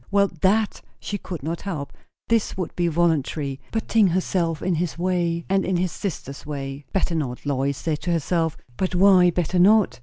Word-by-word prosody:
Well, 200 -1 +3
that 210 +3 +2 0.2
she 205 - -4
could 175 -7 -7
not 165 +3 -3
help; 155 -8 -5 0.3
this 230 -4 +1
would 185 -3 -4
be 175 -1 +1
voluntary; 155 -4 0
put 225 0 -2
ting 220 -3 +4
herself 175 -2 0
in 185 - +1
his 170 0 -2
way, 170 -2 0
and 195 0 +2
in 185 -1 0
his 180 0 0
sister's 140 -8 -5
way. 140 -1 -6
Better 190 -2 0
not, 140 -6 -3
Lois 140 0 0
said 155 -2 -2
to 175 - -2
herself. 165 -1 0 0.2
But 185 -1 -1
why, 185 -1 +6
better 175 +1 0
not? 205 -1 +5
175 Hz, 185 wpm, -23 LUFS, 155-190 Hz, 0.3 s, why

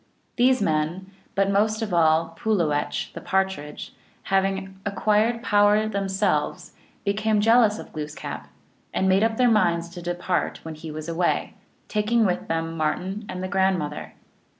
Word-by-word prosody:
These 255 -2 +3
men, 165 +3 -1 0.2
but 195 0 +2
most 215 +2 +1
of 205 -4 -4
all 165 0 +3
Pulowech, 165 -6 -1
the - - -7
Partridge, 190 -6 -2 0.3
having 195 0 -1
acquired 215 +4 +1
power 205 +1 +4
themselves, 195 -1 -1 0.3
became 210 +1 +1
jealous 225 0 +4
of - - -10
Glooskap, 150 - -6 0.5
and 190 - +2
made 190 +1 +4
up 225 0 +1
their 245 -2 +4
minds 170 -6 +2
to 175 0 -9
depart 175 +1 -2
when 160 - -5
he 155 +1 -9
was 155 +1 -6
away, 170 +1 0 0.3
taking 220 +2 +2
with 180 -2 -1
them 165 0 -2
Martin 185 +6 -2
and 185 0 -5
the - - -2
grand 190 -1 +2
mother. 150 -2 -5
190 Hz, 150 wpm, -24 LUFS, 165-210 Hz, 0.5 s, power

